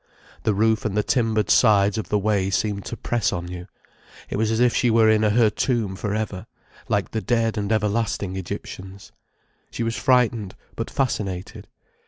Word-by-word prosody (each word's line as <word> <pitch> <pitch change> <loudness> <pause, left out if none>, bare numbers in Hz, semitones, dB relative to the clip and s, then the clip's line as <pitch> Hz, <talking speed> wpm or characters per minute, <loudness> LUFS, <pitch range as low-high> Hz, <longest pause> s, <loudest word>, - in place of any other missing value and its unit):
The 105 - +1
roof 110 +2 +2
and 105 -2 -2
the 105 - +2
timbered 110 -4 +1
sides 105 -4 +4
of 110 - -6
the 105 - +2
way 100 -2 +1
seemed 100 0 -1
to 120 - -5
press 120 -2 0
on 90 -2 -4
you. 90 0 -7 0.6
It - - -1
was 110 +1 +1
as 110 0 0
if 125 -1 +3
she 125 - +2
were 115 -1 +4
in 110 -1 +4
her 110 +1 +3
tomb 110 -4 -1
for 105 +1 -3
ever, 105 -4 -4 0.4
like 100 -1 0
the 110 - -2
dead 115 +2 0
and 105 0 -2
everlasting 105 -2 0
Egyptians. 95 +1 -7 0.6
She 120 - -4
was 115 0 -1
frightened, 120 -6 +1 0.2
but 115 - -4
fascinated. 100 -8 -3
105 Hz, 180 wpm, -23 LUFS, 100-115 Hz, 0.6 s, sides